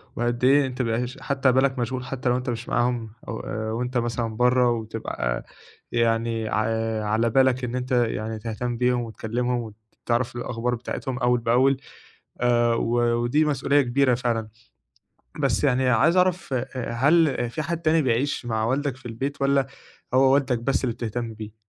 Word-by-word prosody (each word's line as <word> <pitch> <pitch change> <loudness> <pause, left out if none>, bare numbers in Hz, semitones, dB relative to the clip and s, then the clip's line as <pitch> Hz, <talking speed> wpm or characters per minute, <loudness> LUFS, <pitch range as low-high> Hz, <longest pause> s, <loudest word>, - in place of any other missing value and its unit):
وقد 120 +1 -1
إيه 140 +2 +5
أنتَ 130 0 -4
بيبقي 115 0 0
هش 125 +3 -6
حتى 135 -1 +2
بالك 130 0 +2
مشغول 125 +1 -2
حتى 130 -1 -2
لو 125 - +2
أنتَ 125 0 -4
مش 120 0 -4
معاهم، 120 -2 0 0.2
أو 110 - -4
آآ 110 0 -4
وأنتَ 125 +2 -2
مثلًا 115 -1 -2
بره، 125 0 +4
وبتبقى 110 - -3 0.5
يعني 115 -1 0
ع - - -1 0.5
على 110 +2 +1
بالك 130 +1 +3
إن 125 0 -3
أنتَ 125 +1 -4
يعني 110 -3 0
تهتم 115 +2 -4
بيهم، 125 0 +2
وتكلمهم، 115 0 -3 0.3
وتعرف 120 +1 0
الأخبار 120 0 -2
بتاعتهم 125 +2 -5
أول 125 0 +2
بأول، 125 +4 +3 0.6
آآ 120 -1 +3
و 115 - -1 0.3
ودي 150 +6 +2
مسؤولية 145 -1 +2
كبيرة 130 0 +2
فعلًا، 115 -3 -1 0.9
بس - - +1
يعني 130 -2 +2
عايز 160 +8 +4
أعرف 180 -4 +1
آآ، 125 -2 0
آآ 125 -2 -4
هل 140 0 +3
فيه 155 +5 -3
حد 170 +2 -3
تاني 160 0 +3
بيعيش 130 0 0
مع 110 -1 0
والدك 135 +2 -1
في 130 - -14
البيت، 135 +5 -4
والّا 140 -1 +3 0.5
هو 130 +1 +5
والدك 130 -3 +1
بس 130 +3 0
اللي 120 - -1
بتهتم 115 -1 -4
بيه؟ 110 -1 -8
125 Hz, 170 wpm, -24 LUFS, 115-130 Hz, 0.9 s, إيه